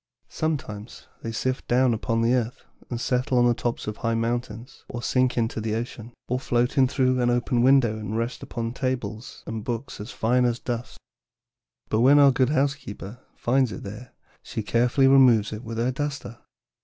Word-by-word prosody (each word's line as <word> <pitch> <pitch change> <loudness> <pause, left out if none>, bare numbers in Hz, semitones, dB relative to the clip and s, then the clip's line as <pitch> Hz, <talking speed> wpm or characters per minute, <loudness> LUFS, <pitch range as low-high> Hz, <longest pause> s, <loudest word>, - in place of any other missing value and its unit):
Sometimes 120 -9 -4 0.2
they 115 - -4
sift 130 +3 -2
down 125 0 +3
upon 115 +1 0
the 120 +2 +3
earth 125 -1 -2 0.2
and 120 - -3
settle 125 +1 0
on 120 - +5
the 120 - +4
tops 120 0 -3
of 105 0 -5
high 115 -2 -1
mountains, 115 0 -3
or 120 -1 -6
sink 125 -1 +1
into 115 -1 0
the 110 0 -1
ocean, 115 0 -5 0.2
or 125 +1 -1
float 120 0 0
in 135 -2 +5
through 130 -1 +1
an 120 - +2
open 120 0 +1
window 125 -4 +4
and 105 +1 -4
rest 115 +2 -3
upon 115 0 -4
tables 125 -4 -4
and 110 -1 -5
books 120 +2 -4
as 105 - -7
fine 125 +1 +2
dust. 120 0 -4 0.9
But 110 - +1
when 135 +5 +6
our 140 -1 +7
good 130 0 +2
housekeeper 135 -7 -2 0.2
finds 130 -1 +1
it 95 - -7
there 105 +5 -9 0.3
she 110 - -5
carefully 120 +5 +3
removes 125 -6 +5
it 110 +2 -7
with 115 -1 -6
her 120 +2 +1
duster. 135 -3 -5
120 Hz, 180 wpm, -25 LUFS, 115-130 Hz, 0.9 s, our